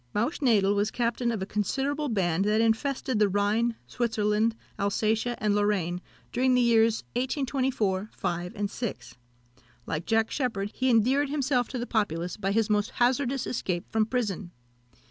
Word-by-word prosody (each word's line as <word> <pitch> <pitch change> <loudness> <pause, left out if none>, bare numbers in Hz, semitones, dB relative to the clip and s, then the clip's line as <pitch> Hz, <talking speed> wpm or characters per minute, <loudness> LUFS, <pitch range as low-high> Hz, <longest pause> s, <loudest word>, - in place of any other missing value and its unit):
Mausch 235 +10 0
Nadel 210 -8 +3
was 205 +1 +1
captain 235 0 0
of 215 -4 -2
a - - -3
considerable 275 +9 -1
band 185 -5 +1
that 210 +1 +2
infested 230 +2 +1
the 210 -1 +4
Rhine, 210 +4 +1
Switzerland, 220 -1 0 0.2
Alsatia, 220 +4 0
and 210 -2 +1
Lorraine, 195 -4 0 0.3
during 255 +1 +2
the 250 - +4
years 230 -1 +3
1824, 255 -6 -1
5, 175 -1 -3
and 205 0 -2
6. 195 - -5 0.7
Like 155 +2 -4
Jack 225 0 +2
Sheppard, 215 -7 -2
he 260 0 0
endeared 255 +5 +3
himself 270 -4 +1
to 255 - -5
the 240 - -2
populace 180 -7 -1
by 195 -2 -2
his 220 +1 +2
most 210 -1 +1
hazardous 255 +1 +1
escape 180 -7 -2
from 220 -1 +2
prison. 210 -7 -2
220 Hz, 155 wpm, -27 LUFS, 205-250 Hz, 0.7 s, the